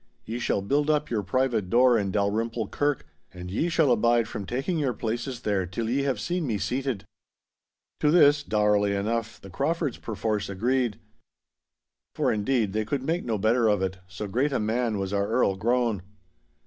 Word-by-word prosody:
Ye 115 +2 -4
shall 100 -4 0
build 145 +8 +1
up 150 -3 +1
your 110 -3 +1
private 110 -1 0
door 125 +3 +5
in 100 -3 0
Dalrymple 110 +2 -1
Kirk, 145 -1 -1 0.3
and 90 0 -8
ye 160 - 0
shall 160 -5 +3
abide 120 0 +3
from 100 -4 -6
taking 135 +8 -1
your 130 -5 0
places 120 +3 -3
there 95 -4 0
till 110 +6 -3
ye 135 +3 +1
have 135 -5 -1
seen 175 +4 -2
me 110 -4 0
seated.' 125 +3 -2 0.9
To 150 - +3
this, 145 -3 +6
dourly 105 -5 +2
enough, 110 +3 -2
the 95 - -12
Craufords 150 - -1
perforce 105 -1 -2
agreed. 120 +3 0 1.2
For, - - +1
indeed, 110 -1 0
they 110 0 0
could 130 +5 -2
make 165 +5 -1
no 115 -3 -1
better 115 +3 +2
of 105 -3 +2
it, 95 0 -3
so 95 +3 -6
great 125 +9 0
a 135 - 0
man 110 +1 0
was 95 0 -3
our 100 0 +1
Earl 110 -4 +2
grown. 115 -1 +1
115 Hz, 180 wpm, -26 LUFS, 100-130 Hz, 1.2 s, this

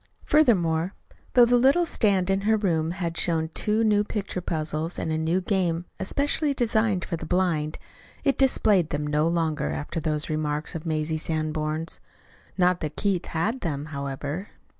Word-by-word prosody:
Furthermore, 185 - +3 0.4
though 245 -1 +7
the 245 +1 +4
little 275 +8 +4
stand 195 - +1
in 195 0 +1
her 220 +2 +3
room 165 -6 0
had 170 -1 -3
shown 160 -2 0
two 215 +6 0
new 210 -2 +3
picture 200 -3 -4
puzzles 155 0 -3
and 160 - -2
a - - +1
new 165 +4 +1
game 180 -3 0
especially 280 +8 0
designed 220 -6 +1
for 170 - -3
the 160 - -7
blind, 165 -4 0 0.5
it 275 -2 +2
displayed 210 - +3
them 145 0 -2
no 150 +2 +1
longer 160 - 0
after 75 - -3
those 155 -1 -1
remarks 155 -1 -2
of 165 0 -6
Mazie 155 0 -1
Sanborn's. 155 0 -2 0.6
Not 180 -1 +3
that 155 -1 -4
Keith 190 -4 0
had 215 +10 -1
them, 145 -4 -3
however. 140 +6 -4
170 Hz, 160 wpm, -25 LUFS, 155-205 Hz, 0.6 s, though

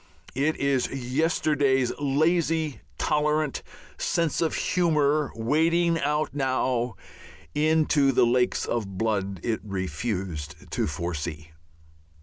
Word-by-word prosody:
It 145 +5 +1
is 140 -2 +1
yesterday's 135 -1 +1
lazy, 155 +1 +1 0.2
tolerant, 150 -1 +1 0.4
"sense 165 -1 0
of 165 - +1
humour" 155 -4 +2
wading 165 +8 +2
out 150 0 0
now 130 -4 0 0.6
into 155 -2 +3
the 125 - +4
lakes 125 +1 +1
of 100 -5 -3
blood 100 -3 -1
it 115 -2 -1
refused 95 -5 -4
to - - 0
foresee. 80 0 -4
135 Hz, 100 wpm, -26 LUFS, 110-155 Hz, 0.6 s, the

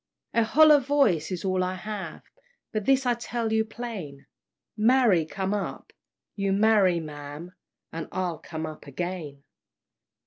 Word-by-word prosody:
"A 230 - +4
hollow 300 +6 +6
voice 250 - +2
is 180 0 -4
all 185 -1 +1
I 185 0 -2
have, 190 -3 -6 0.5
But 215 -2 -2
this 270 0 +3
I 245 - +3
tell 235 -1 -3
you 220 0 +3
plain, 215 - -7 0.5
Marry 220 -6 +4
come 195 +3 -2
up! 205 -1 -4 0.4
you 195 -1 0
marry, 200 -4 +4
ma'am, 150 +2 -8 0.4
And 165 -1 -5
I'll 180 -4 -2
come 160 -1 -6
up 155 -1 -9
again." 150 -1 -5
190 Hz, 140 wpm, -26 LUFS, 165-225 Hz, 0.5 s, hollow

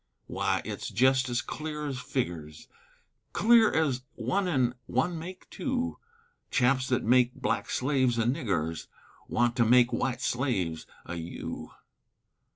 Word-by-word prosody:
Wy, - - 0
it's - - -4
jest 130 +1 +3
ez 120 +2 0
clear 150 -1 -5
es 135 -3 -3
figgers, 85 - -4 0.7
Clear 225 0 +5
ez 145 -5 +1
one 195 0 0
an' 130 -7 +2
one 160 +7 0
make 180 +3 -9
two, 255 -1 -2 0.5
Chaps 130 0 +2
thet 125 -1 +1
make 125 +1 +4
black - - -1
slaves 130 -3 +1
o' 115 - +2
niggers 100 - -1 0.4
Want 120 0 +1
to 120 - +5
make 120 +1 +5
wite 125 -1 -1
slaves 100 - -1 0.2
o' 90 - -6
you. 85 -1 -6
125 Hz, 135 wpm, -29 LUFS, 120-150 Hz, 0.7 s, Clear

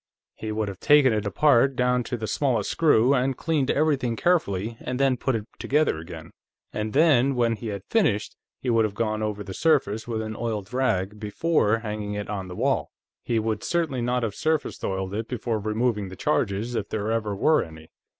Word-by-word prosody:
He 110 - -6
would 105 0 -1
have 95 -2 -6
taken 145 -4 +5
it 105 -1 -1
apart, 135 +4 +3
down 125 0 +2
to 120 - -3
the 110 - -4
smallest 125 +3 0
screw, 140 -5 +4
and 130 0 +1
cleaned 155 -5 0
everything 140 -6 +1
carefully, 115 - 0
and 125 +1 -4
then 135 -2 +3
put 130 +1 -1
it 105 -2 -3
together 150 - +1
again, 80 -1 -9 0.4
and 105 0 -3
then, 140 -4 +4
when 120 -2 +2
he 115 - -7
had 100 -3 -5
finished, 120 - +1 0.3
he 125 - +1
would 115 -1 +4
have 105 -2 -2
gone 110 -1 -1
over 105 -1 -2
the 95 -1 -7
surface 115 - +1
with 110 -2 -2
an 110 0 -5
oiled 110 -2 -4
rag, 105 -6 0
before 110 +1 +1
hanging 105 -2 -4
it 105 +1 -4
on 95 -2 -4
the 90 - -8
wall. - - 0 0.3
He 115 - 0
would 110 0 -1
certainly 160 -7 -1
not 125 +1 0
have 110 -3 -1
surface 155 +4 -1
oiled 95 0 -2
it 110 +2 -3
before 115 -3 -2
removing 110 0 -1
the 95 - -9
charges, 110 -1 -1
if 105 -3 -3
there 110 0 -2
ever 110 -3 -1
were 155 +10 +3
any. 80 -1 -10
115 Hz, 200 wpm, -25 LUFS, 105-130 Hz, 0.4 s, taken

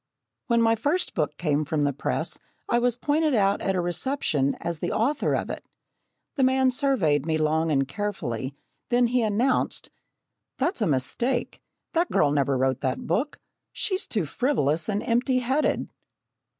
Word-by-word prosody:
When 235 -1 +3
my 225 0 +4
first 290 +11 0
book 150 -2 -1
came 155 -3 +1
from 150 0 -1
the 145 0 +1
press 135 - -2 0.3
I 240 - +2
was 245 -1 +1
pointed 300 +2 +1
out 200 -2 +2
at 195 - 0
a 180 - +1
reception 175 - 0
as 170 -2 -3
the - - -2
author 270 +7 +1
of - - -2
it. - - -6 0.7
The 270 - +3
man 260 0 +4
surveyed 195 - +1
me 160 -1 +1
long 155 +1 +1
and 135 -2 +2
carefully, 140 - -3 0.3
then 245 0 +4
he 245 +1 +2
announced: 225 +4 0 0.7
"That's 340 -8 0
a 210 - +2
mistake. 235 - -1 0.3
That 340 +1 +1
girl 145 - +3
never 140 -2 +1
wrote 130 0 0
that 130 -2 -2
book. 235 - -1 0.4
She's 375 -2 -1
too 205 -7 -1
frivolous 155 - 0
and 205 0 -1
empty 245 +3 +2
headed!" 260 +4 0
205 Hz, 165 wpm, -26 LUFS, -, 0.7 s, my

